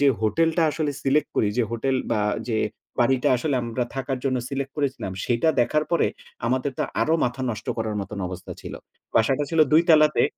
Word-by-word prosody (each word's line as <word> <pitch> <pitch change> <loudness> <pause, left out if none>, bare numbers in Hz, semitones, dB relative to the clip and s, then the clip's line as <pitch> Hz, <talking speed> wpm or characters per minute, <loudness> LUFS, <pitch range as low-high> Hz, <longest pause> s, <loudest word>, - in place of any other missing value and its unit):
যে 145 - +4
হোটেলটা 165 +9 +2
আসলে 150 -1 -1
সিলেক্ট 140 +3 +2
করি। 105 - +3
যে - - +4
হোটেল 125 +3 0 0.2
বা 110 -2 +1 0.3
যে 110 -2 +1 0.4
বাড়িটা 125 +1 +3
আসলে 140 +3 -1
আমরা 120 +1 -2
থাকার 135 0 -2
জন্য 130 -2 +1
সিলেক্ট 135 0 -3
করেছিলাম। 135 -9 -2
সেটা 120 +6 +1
দেখার 150 +5 +2
পরে 170 - +3 0.4
আমাদের 130 +2 0
তো - - +1 0.2
আরো 160 - +3
মাথা 125 +2 -2
নষ্ট 110 - -6
করার 110 -1 -2
মতন 100 +1 -6
অবস্থা 90 0 -7
ছিল। - - -7 0.4
বাসাটা 130 +6 +3
ছিল 165 -1 +2
২ 160 +2 +7
তালাতে 155 -2 +5
135 Hz, 185 wpm, -24 LUFS, 115-150 Hz, 0.4 s, ২